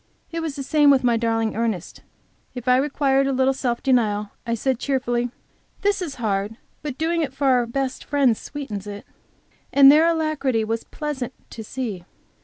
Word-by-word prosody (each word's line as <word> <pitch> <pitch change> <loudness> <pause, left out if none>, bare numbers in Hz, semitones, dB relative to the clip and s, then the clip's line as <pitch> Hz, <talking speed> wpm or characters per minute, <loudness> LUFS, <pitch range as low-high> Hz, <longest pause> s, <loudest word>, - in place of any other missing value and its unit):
It 335 - -3
was 320 -4 -3
the 275 - -4
same 295 +1 +4
with 270 -2 +5
my 240 -1 +3
darling 225 -1 0
Ernest. 220 -6 -3 0.5
If 250 0 -7
I 250 0 +5
required 275 -1 +2
a - - +1
little 265 0 +2
self 245 -3 -2
denial, 210 -5 +1 0.2
I 230 - +1
said 260 +1 -1
cheerfully, 245 -3 0 0.5
"This 405 -1 +2
is 320 -6 -4
hard, 210 -1 -2 0.2
but 290 -3 -5
doing 335 +1 0
it 270 -4 -3
for 280 - -2
our 250 -3 +3
best 260 +2 -3
Friend 275 -5 +3
sweetens 215 -7 -7
it," 205 0 -7 0.7
and 275 -1 +8
their 310 +3 +5
alacrity 310 -8 0
was 225 +1 -3
pleasant 280 -5 -5 0.2
to 225 - -7
see. 215 -6 -5
260 Hz, 180 wpm, -23 LUFS, 230-280 Hz, 0.7 s, and